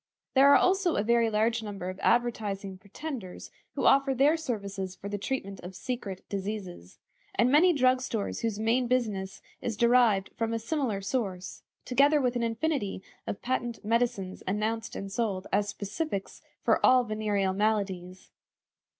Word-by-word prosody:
There 275 Hz, +1 st, +7 dB
are -, -, +8 dB
also 370 Hz, -2 st, +2 dB
a 205 Hz, -, +1 dB
very 235 Hz, 0 st, +3 dB
large 225 Hz, +2 st, +1 dB
number 200 Hz, -4 st, -6 dB
of 185 Hz, +1 st, -6 dB
advertising 205 Hz, -5 st, 0 dB
pretenders 215 Hz, -, -7 dB, 0.2 s
who -, -, -1 dB
offer 275 Hz, 0 st, +4 dB
their 285 Hz, +5 st, +4 dB
services 200 Hz, -, -4 dB
for 200 Hz, -, -8 dB
the 205 Hz, 0 st, -3 dB
treatment 200 Hz, -4 st, -4 dB
of 180 Hz, +2 st, -9 dB
secret 205 Hz, -6 st, -5 dB
diseases; 195 Hz, -, -5 dB, 0.4 s
and 240 Hz, +2 st, +3 dB
many 330 Hz, +6 st, +6 dB
drug 255 Hz, -4 st, +3 dB
stores 225 Hz, -5 st, -3 dB
whose 225 Hz, -3 st, -2 dB
main 230 Hz, +3 st, +1 dB
business 215 Hz, -6 st, -1 dB, 0.2 s
is 230 Hz, -3 st, -3 dB
derived 235 Hz, -5 st, +4 dB
from 230 Hz, 0 st, -1 dB
a -, -, +1 dB
similar 230 Hz, -4 st, -2 dB
source; 195 Hz, -4 st, -3 dB, 0.2 s
together 285 Hz, +4 st, +4 dB
with 250 Hz, -3 st, 0 dB
an 240 Hz, -, 0 dB
infinity 230 Hz, -4 st, -1 dB, 0.2 s
of -, -, -5 dB
patent 240 Hz, -3 st, -2 dB
medicines 230 Hz, -4 st, 0 dB
announced 220 Hz, +3 st, -2 dB
and 195 Hz, 0 st, -5 dB
sold 195 Hz, -3 st, -1 dB
as 205 Hz, +1 st, +2 dB
specifics 200 Hz, +1 st, -4 dB, 0.2 s
for -, -, +2 dB
all 255 Hz, -1 st, +6 dB
venereal 210 Hz, -4 st, 0 dB
maladies. 190 Hz, -3 st, -2 dB
220 Hz, 155 wpm, -28 LUFS, 195-250 Hz, 0.4 s, are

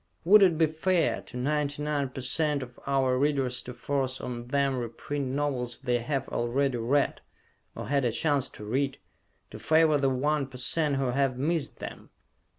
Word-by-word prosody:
Would 205 Hz, +4 st, +8 dB
it 180 Hz, -5 st, +5 dB
be 160 Hz, -, +5 dB
fair 160 Hz, +3 st, +1 dB
to 125 Hz, -, -10 dB
99% 145 Hz, 0 st, -1 dB
of 125 Hz, -1 st, -12 dB
our 135 Hz, -2 st, +2 dB
Readers 135 Hz, -3 st, +1 dB
to 125 Hz, -, -8 dB
force 130 Hz, +1 st, -2 dB
on 120 Hz, -1 st, -6 dB
them 140 Hz, 0 st, +1 dB
reprint 130 Hz, +4 st, -4 dB
novels 130 Hz, -3 st, -2 dB
they 125 Hz, -3 st, 0 dB
have 135 Hz, +2 st, -2 dB
already 125 Hz, +2 st, 0 dB
read, 135 Hz, +5 st, +1 dB, 0.5 s
or -, -, -6 dB
had 140 Hz, 0 st, +1 dB
a 120 Hz, -, +1 dB
chance 140 Hz, +3 st, +1 dB
to 105 Hz, -, -10 dB
read, 135 Hz, +5 st, -1 dB, 0.5 s
to -, -, -9 dB
favor 155 Hz, -2 st, +4 dB
the 135 Hz, -1 st, +2 dB
1% 140 Hz, +2 st, 0 dB
who 135 Hz, 0 st, 0 dB
have 135 Hz, -1 st, +1 dB
missed 150 Hz, +2 st, -1 dB
them? -, -, -8 dB
135 Hz, 155 wpm, -28 LUFS, 125-150 Hz, 0.5 s, Would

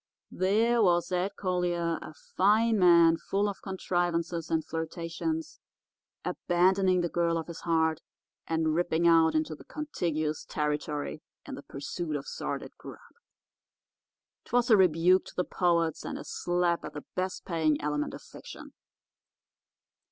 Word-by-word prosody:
There 225 Hz, +5 st, +2 dB
was 175 Hz, -3 st, +2 dB
Ed 185 Hz, +2 st, 0 dB
Collier, 175 Hz, -3 st, -1 dB
a 155 Hz, -, -10 dB, 0.2 s
fine 215 Hz, +3 st, +3 dB
man 170 Hz, -2 st, +6 dB
full 200 Hz, +4 st, -1 dB
of 200 Hz, -, -5 dB
contrivances 175 Hz, -3 st, -2 dB
and 160 Hz, -1 st, 0 dB
flirtations, 165 Hz, -, -4 dB, 0.7 s
abandoning 185 Hz, +1 st, +2 dB
the 175 Hz, -, 0 dB
girl 170 Hz, 0 st, 0 dB
of 165 Hz, -, -3 dB
his 170 Hz, -, -8 dB
heart 160 Hz, -2 st, +1 dB, 0.5 s
and 160 Hz, -1 st, 0 dB
ripping 170 Hz, 0 st, +1 dB
out 165 Hz, -1 st, +5 dB
into 155 Hz, 0 st, 0 dB
the 150 Hz, -, -12 dB
contiguous 160 Hz, -, -3 dB
territory 150 Hz, 0 st, -3 dB, 0.2 s
in -, -, -8 dB
the -, -, -7 dB
pursuit 150 Hz, +4 st, -5 dB
of 140 Hz, -, -4 dB
sordid -, -, -5 dB
grub. -, -, -10 dB, 1.4 s
'Twas 245 Hz, 0 st, +1 dB
a -, -, +9 dB
rebuke 180 Hz, 0 st, +4 dB
to -, -, -12 dB
the 180 Hz, -, +1 dB
poets 170 Hz, -3 st, 0 dB
and -, -, -5 dB
a -, -, -7 dB
slap 175 Hz, -1 st, -1 dB
at 150 Hz, -, -7 dB
the 145 Hz, -, -8 dB
best 185 Hz, 0 st, -3 dB
paying 160 Hz, -4 st, +1 dB
element 150 Hz, 0 st, -2 dB
of -, -, -11 dB
fiction. -, -, -12 dB
170 Hz, 140 wpm, -29 LUFS, 160-185 Hz, 1.4 s, a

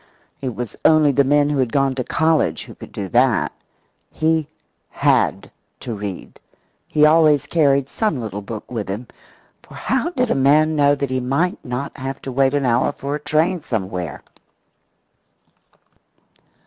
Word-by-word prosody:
It 130 Hz, -4 st, -4 dB
was 120 Hz, -4 st, -5 dB
only 155 Hz, -2 st, +5 dB
the 140 Hz, +1 st, +3 dB
men 145 Hz, +1 st, +2 dB
who 145 Hz, -, 0 dB
had 125 Hz, -3 st, +1 dB
gone 135 Hz, -1 st, +2 dB
to 130 Hz, -1 st, -3 dB
college 160 Hz, -, +1 dB
who -, -, -12 dB
could -, -, -12 dB
do 100 Hz, -, -5 dB
that. 125 Hz, 0 st, +2 dB, 0.6 s
He 160 Hz, -1 st, 0 dB, 0.4 s
had -, -, +1 dB, 0.3 s
to 120 Hz, -, -5 dB
read. 100 Hz, -3 st, -7 dB, 0.5 s
He 150 Hz, 0 st, +3 dB
always 155 Hz, -2 st, +4 dB
carried 140 Hz, -5 st, +2 dB
some 210 Hz, -, -1 dB
little 105 Hz, -3 st, -5 dB
book 105 Hz, +3 st, -8 dB
with 110 Hz, -5 st, -4 dB
him, 105 Hz, +6 st, -4 dB, 0.6 s
for -, -, -16 dB
how 265 Hz, +5 st, -1 dB
did 250 Hz, -8 st, -1 dB
a -, -, +2 dB
man 150 Hz, +3 st, +3 dB
know 145 Hz, -1 st, +4 dB
that 140 Hz, -2 st, -3 dB
he 130 Hz, -, 0 dB
might 140 Hz, -, -1 dB
not 125 Hz, +3 st, -5 dB
have 135 Hz, 0 st, -5 dB
to 135 Hz, -, -5 dB
wait 135 Hz, +2 st, +2 dB
an 140 Hz, -2 st, 0 dB
hour 120 Hz, 0 st, +2 dB
for 140 Hz, +1 st, -5 dB
a 150 Hz, -, -2 dB
train 160 Hz, +4 st, 0 dB
somewhere? 95 Hz, -, -4 dB
140 Hz, 160 wpm, -20 LUFS, 125-155 Hz, 0.6 s, only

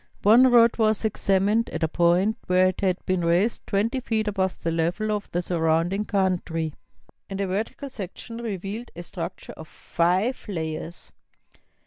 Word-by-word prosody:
One 240 Hz, +5 st, +7 dB
road 235 Hz, -1 st, +5 dB
was 220 Hz, 0 st, +2 dB
examined 205 Hz, +1 st, +1 dB
at -, -, -4 dB
a -, -, +3 dB
point 175 Hz, +6 st, +2 dB
where 185 Hz, 0 st, +4 dB
it 185 Hz, -, -6 dB
had 185 Hz, -2 st, +1 dB
been 185 Hz, -2 st, 0 dB
raised 175 Hz, +7 st, +1 dB
twenty 225 Hz, +6 st, 0 dB
feet 220 Hz, -3 st, -1 dB
above 190 Hz, -2 st, -1 dB
the 165 Hz, -, 0 dB
level 175 Hz, +6 st, 0 dB
of 210 Hz, -1 st, -3 dB
the 175 Hz, +1 st, -2 dB
surrounding 170 Hz, +4 st, 0 dB
country, 175 Hz, -5 st, -1 dB, 0.6 s
and 195 Hz, 0 st, -5 dB
a 200 Hz, -, 0 dB
vertical 215 Hz, +8 st, -4 dB
section 215 Hz, +3 st, -7 dB
revealed 215 Hz, 0 st, -5 dB
a 175 Hz, -, -7 dB
structure -, -, -7 dB
of 160 Hz, -, -11 dB
five 185 Hz, +13 st, 0 dB
layers. 165 Hz, -1 st, -5 dB
190 Hz, 155 wpm, -25 LUFS, 175-215 Hz, 0.6 s, One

